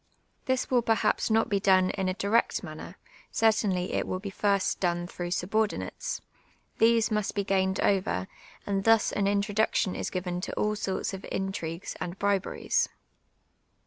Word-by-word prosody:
This 260 0 0
will 250 -2 +4
perha])s 225 0 +1
not 225 0 +3
be 200 -4 +1
done 190 -1 +4
in 190 -2 -1
a 185 - -2
direct 205 +3 +1
mauTu 155 -3 -7
r. 180 - -11 0.3
cer 225 - +4
tainly 190 -5 0
it - - 0
will 185 - -2
be 195 +1 -6
first 200 -1 +1
done 175 -1 0
through 175 0 -5
subordinates; 215 - -1 0.6
these 230 0 +4
must 210 -2 -1
be 200 -1 0
piined 190 -1 +1
over, 190 -1 +1 0.4
and 195 -1 -1
thus 225 0 +4
an 200 -1 0
introduction 205 -1 +1
is - - -3
given 180 -1 -3
to - - -4
all 210 0 0
sorts 195 -1 -2
of 190 - -5
intri«i;ucs 185 -3 -3
and 175 +2 -4
briberies. 200 -1 0
195 Hz, 165 wpm, -28 LUFS, 185-215 Hz, 0.6 s, will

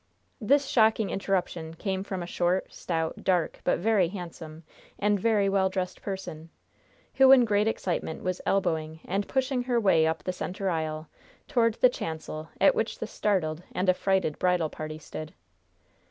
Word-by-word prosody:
This 275 +5 +3
shocking 220 -4 +3
interruption 180 -4 -2
came 190 +2 -2
from 190 -3 -4
a - - -5
short, 180 +1 -1
stout, 160 -2 -3
dark, 180 -4 +1
but - - +2
very 205 -2 +2
handsome, 165 -3 -8 0.3
and 205 0 +1
very 210 -1 +2
well 195 -1 +2
dressed 185 -1 -4
person, 170 -5 -6 0.6
who, 265 0 +6
in 255 -3 +8
great 210 -1 +2
excitement, 175 -7 -2
was 185 0 -2
elbowing 160 -4 -1
and 195 +2 -2
pushing 260 -2 0
her 245 -2 +2
way 170 -7 +4
up 160 -1 -2
the 185 - -2
center 190 +1 -3
aisle 155 -1 -3 0.4
toward 230 -5 +2
the 255 - +6
chancel 160 -6 -6
at - - +6
which 465 - -2
the - - -4
startled 170 -6 -1
and 185 +1 0
affrighted 190 -4 0
bridal 180 -4 +1
party 155 0 -6
stood. 155 0 -8
185 Hz, 160 wpm, -27 LUFS, 160-210 Hz, 0.6 s, in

